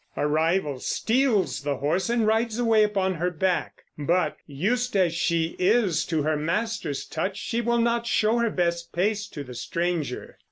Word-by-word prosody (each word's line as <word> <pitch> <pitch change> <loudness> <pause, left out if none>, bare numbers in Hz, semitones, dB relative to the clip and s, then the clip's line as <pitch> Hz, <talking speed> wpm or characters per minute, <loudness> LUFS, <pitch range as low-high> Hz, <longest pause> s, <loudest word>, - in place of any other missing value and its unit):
A - - +1
rival 155 -1 +1
steals 225 - +1
the 145 -1 -2
horse 165 - 0
and 235 -2 +2
rides 225 +1 +1
away 230 -3 +3
upon 195 -3 +1
her 175 +1 -1
back; 180 +1 -1 0.2
but, 160 +1 +1
used 220 - -1
as 180 -4 +3
she 165 -1 0
is 195 -2 +2
to 160 -3 0
her 155 +1 +1
master's 165 -1 -2
touch, 190 +5 -3
she 235 - -2
will 235 0 +1
not 235 0 +1
show 225 0 +2
her 235 -1 +2
best 170 -3 -1
pace 205 +3 0
to 145 - -7
the 125 -2 -10
stranger. 165 +1 -3
185 Hz, 170 wpm, -25 LUFS, 160-225 Hz, 0.2 s, away